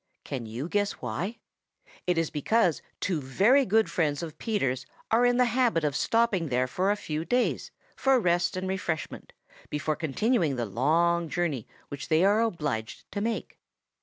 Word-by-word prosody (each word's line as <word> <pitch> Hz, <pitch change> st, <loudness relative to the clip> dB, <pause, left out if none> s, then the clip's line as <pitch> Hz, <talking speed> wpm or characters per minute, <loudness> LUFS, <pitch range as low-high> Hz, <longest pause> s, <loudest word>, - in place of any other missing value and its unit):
Can 125 Hz, -5 st, -5 dB
you 120 Hz, +7 st, -4 dB
guess 205 Hz, +2 st, 0 dB
why? 170 Hz, -, -4 dB, 0.7 s
It 180 Hz, -1 st, +2 dB
is 165 Hz, -1 st, 0 dB
because 175 Hz, +3 st, +2 dB, 0.2 s
two 175 Hz, -6 st, -1 dB
very 215 Hz, -, +3 dB
good 220 Hz, +2 st, +3 dB
friends 155 Hz, -2 st, 0 dB
of 155 Hz, -2 st, -8 dB
Peter's 135 Hz, -, -1 dB, 0.2 s
are 240 Hz, +2 st, +5 dB
in 245 Hz, 0 st, +2 dB
the 250 Hz, -, +5 dB
habit 240 Hz, -8 st, +2 dB
of 145 Hz, -2 st, 0 dB
stopping 215 Hz, -8 st, +1 dB
there 125 Hz, 0 st, +2 dB
for 185 Hz, +9 st, 0 dB
a 205 Hz, -, +3 dB
few 155 Hz, -6 st, -4 dB
days 245 Hz, +7 st, 0 dB, 0.3 s
for 270 Hz, -1 st, +3 dB
rest 175 Hz, -2 st, +1 dB
and 185 Hz, 0 st, -3 dB
refreshment 175 Hz, -6 st, -3 dB, 0.4 s
before 150 Hz, +1 st, -1 dB
continuing 165 Hz, -, +1 dB
the 120 Hz, -1 st, -1 dB
long 165 Hz, -, +1 dB
journey 155 Hz, -10 st, -2 dB, 0.2 s
which 140 Hz, -1 st, -6 dB
they 160 Hz, +3 st, +3 dB
are 205 Hz, +3 st, +4 dB
obliged 150 Hz, -, -3 dB
to 200 Hz, -, -3 dB
make. 225 Hz, +1 st, -3 dB
170 Hz, 165 wpm, -28 LUFS, 145-215 Hz, 0.7 s, are